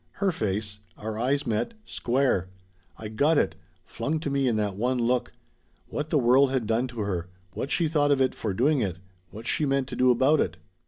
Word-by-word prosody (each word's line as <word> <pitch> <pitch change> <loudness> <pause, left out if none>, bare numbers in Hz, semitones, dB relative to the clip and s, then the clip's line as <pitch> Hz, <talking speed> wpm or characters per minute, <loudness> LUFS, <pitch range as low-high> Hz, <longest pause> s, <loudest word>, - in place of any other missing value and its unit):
Her 200 -2 +1
face. 105 - -2 0.2
Our 110 0 -5
eyes 135 +4 +1
met 115 - -1
square. 120 -7 0 0.5
I 110 - -6
got 145 +9 +2
it - - +2 0.3
flung 145 +8 -2
to 145 - -2
me 140 -1 +1
in 120 - +2
that 105 -3 -1
one 125 +5 0
look. 125 +1 +1 0.6
What 150 +1 -3
the 155 - +2
world 130 +2 +5
had 130 -3 0
done 115 +4 +1
to 120 -3 -6
her 90 -4 -2 0.3
what 135 - -4
she 165 +2 +2
thought 150 -2 +2
of 140 -2 +3
it 130 -1 +2
for 110 - -3
doing 130 +8 +2
it 95 -5 -2 0.3
what 110 +2 -10
she 155 - +1
meant 135 -2 +1
to - - -5
do 125 0 +4
about 135 +5 +4
it. - - 0
125 Hz, 210 wpm, -26 LUFS, 110-140 Hz, 0.6 s, world